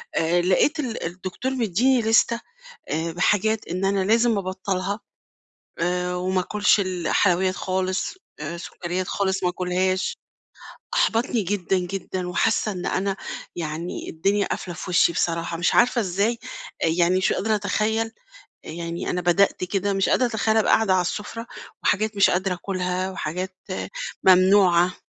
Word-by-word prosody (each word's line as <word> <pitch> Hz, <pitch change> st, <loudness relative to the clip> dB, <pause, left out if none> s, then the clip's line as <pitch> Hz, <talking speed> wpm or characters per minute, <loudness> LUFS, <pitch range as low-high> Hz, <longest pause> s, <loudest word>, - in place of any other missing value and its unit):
آآ، 170 Hz, +2 st, +2 dB
لقيت 190 Hz, -, +2 dB
ال 250 Hz, -6 st, -3 dB
الدكتور 185 Hz, +9 st, -4 dB
مدّيني 240 Hz, +3 st, +2 dB
لِستة 225 Hz, +1 st, +3 dB, 0.5 s
آآ 160 Hz, +2 st, -1 dB
بحاجات 210 Hz, +5 st, +1 dB
إن 185 Hz, +3 st, -2 dB
أنا 195 Hz, -1 st, +1 dB
لازم 230 Hz, +1 st, +3 dB
أبطّلها 190 Hz, +1 st, -2 dB, 0.8 s
آآ، 180 Hz, +1 st, -1 dB
وما 185 Hz, +1 st, 0 dB
آكُلش 205 Hz, +3 st, +2 dB
الحلويّات 185 Hz, 0 st, +1 dB
خالص 185 Hz, 0 st, -1 dB, 0.3 s
آآ، 155 Hz, +3 st, -4 dB
سكريّات 180 Hz, +1 st, -4 dB
خالص 195 Hz, -1 st, -1 dB
ما -, -, +3 dB
أكُلهاش، 185 Hz, +1 st, -1 dB, 0.8 s
أحبطني 230 Hz, 0 st, +1 dB
جدًا، 190 Hz, 0 st, 0 dB
جدًا، 180 Hz, 0 st, -4 dB
وحاسّة 215 Hz, +4 st, +1 dB
إن 180 Hz, -2 st, -5 dB
أنا 195 Hz, 0 st, -1 dB, 0.4 s
يعني 165 Hz, +1 st, -4 dB
الدنيا 195 Hz, +5 st, +1 dB
قافلة 175 Hz, -2 st, -4 dB
في 185 Hz, -, -7 dB
وشّي 175 Hz, -1 st, +4 dB
بصراحة، 170 Hz, 0 st, -1 dB
مش 175 Hz, +1 st, +1 dB
عارفة 245 Hz, 0 st, +4 dB
إزاي، 205 Hz, +4 st, 0 dB, 0.4 s
يعني 170 Hz, +2 st, +3 dB
مش 185 Hz, -, +2 dB
قادرة 220 Hz, +1 st, 0 dB
أتخيّل، 215 Hz, +2 st, 0 dB, 0.5 s
يعني 170 Hz, +1 st, -5 dB
أنا 180 Hz, -, -1 dB
بدأت 180 Hz, +2 st, +2 dB
كده 195 Hz, +2 st, -1 dB
مش 195 Hz, 0 st, +1 dB
قادرة 255 Hz, -, +3 dB
أتخيّل 220 Hz, -1 st, +1 dB
ابقى 220 Hz, -, +3 dB
قاعدة 220 Hz, -4 st, +3 dB
على 185 Hz, -, +3 dB
السُّفرة، 210 Hz, +6 st, -4 dB, 0.4 s
وحاجات 215 Hz, +1 st, +1 dB
مش 200 Hz, -, +5 dB
قادرة 185 Hz, +1 st, 0 dB
آكُلها 185 Hz, 0 st, -2 dB
وحاجات 185 Hz, +1 st, -4 dB, 0.7 s
ممنوعة. 185 Hz, -1 st, +5 dB
185 Hz, 140 wpm, -23 LUFS, 180-205 Hz, 0.8 s, مش